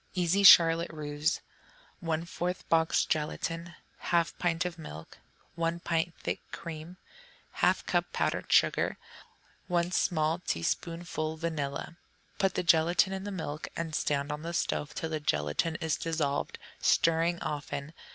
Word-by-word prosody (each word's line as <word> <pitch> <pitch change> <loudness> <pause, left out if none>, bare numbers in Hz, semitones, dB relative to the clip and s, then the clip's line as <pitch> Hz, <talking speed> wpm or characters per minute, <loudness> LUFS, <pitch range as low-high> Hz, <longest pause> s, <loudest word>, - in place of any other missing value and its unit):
Easy 180 +2 +2
Charlotte 170 -3 +8
Russe 150 +1 -1 0.6
1/4 170 +2 -2
box 160 0 +3
gelatine. 165 +2 -2 0.3
1/2 170 -1 +2
pint 175 0 +1
of 170 -2 -4
milk. 80 - -10 0.3
1 170 0 -1
pint 165 0 -1
thick - - -3
cream. 165 +1 -7 0.6
1/2 - - +2
cup - - 0
powdered - - -1
sugar. - - +3 0.7
1 175 -1 +1
small 160 -2 +1
teaspoonful 165 - -2
vanilla. 160 -1 -3 0.4
Put 195 -1 +2
the - - 0
gelatine 170 +3 +4
in 190 +1 -4
the 205 - -4
milk 155 -5 -4
and 165 -1 -4
stand 145 -1 0
on 150 0 -4
the 170 +1 -4
stove 150 -2 -1
till 160 - -3
the 155 - -1
gelatine 75 - 0
is 160 -1 0
dissolved, 155 -4 -1 0.2
stirring 165 +1 +3
often. 145 0 -4
165 Hz, 130 wpm, -30 LUFS, 155-170 Hz, 0.7 s, Charlotte